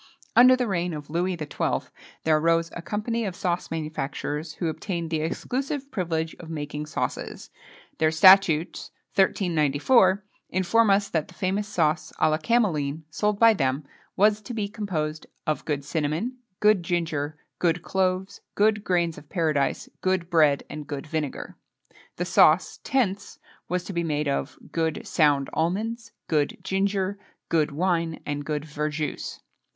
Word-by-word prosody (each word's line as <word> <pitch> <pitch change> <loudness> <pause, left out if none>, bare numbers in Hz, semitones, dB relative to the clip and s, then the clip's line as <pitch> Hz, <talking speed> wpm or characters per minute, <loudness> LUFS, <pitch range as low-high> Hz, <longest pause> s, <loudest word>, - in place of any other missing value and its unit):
Under 255 +1 +8
the 255 -1 0
reign 175 -4 -1
of 150 -1 -8
Louis 180 +3 0
XII. 155 -3 -2 0.4
there 160 -1 +4
arose 165 +1 +2
a 175 - -6
company 220 +5 -2
of 190 -4 -3
sauce 180 -1 -2
manufacturers, 155 0 -4
who 170 - -2
obtained 170 0 -3
the 160 -1 0
exclusive 270 - -3
privilege 165 -4 -2
of 165 - -10
making 150 -1 -5
sauces. - - -4 0.5
Their 155 - +4
statutes 170 -1 +5 0.2
(1394) 185 - +3 0.3
inform 195 +5 +3
us 200 +1 +3
that 160 -3 -1
the - - -16
famous 200 +2 -1
sauce 160 -6 0
à 155 - +4
la 155 - +1
cameline, 160 -9 +1
sold 210 +4 0
by 230 +1 +7
them, 135 -4 -1 0.3
was 210 +1 +4
to 230 +3 -7
be 210 -2 -1
composed 165 -8 -3 0.2
"of 155 - -1
good 145 -2 -2
cinnamon, 160 - -2 0.2
good 210 -3 +4
ginger, 160 -4 -2 0.2
good 175 -1 +1
cloves, 190 0 -1
good 210 0 +3
grains 175 -4 0
of 145 - -19
paradise, 155 -6 0
good 185 -2 0
bread, 150 -4 +4
and 150 -1 -7
good 140 -2 -5
vinegar." 155 -3 -4 0.6
The - - -2
sauce, - - +4
Tence, 205 -8 -1 0.3
was 180 0 -1
to 195 - -7
be 170 -1 0
made 150 -2 -1
of 140 - -2
"good 160 -1 -1
sound 145 -3 +3
almonds, 220 +7 -1 0.2
good 150 -3 +1
ginger, 195 0 0 0.3
good 155 -2 +2
wine, 165 +1 0
and 145 0 -3
good 150 0 -3
verjuice." 150 0 -3
170 Hz, 150 wpm, -25 LUFS, 155-195 Hz, 0.6 s, Under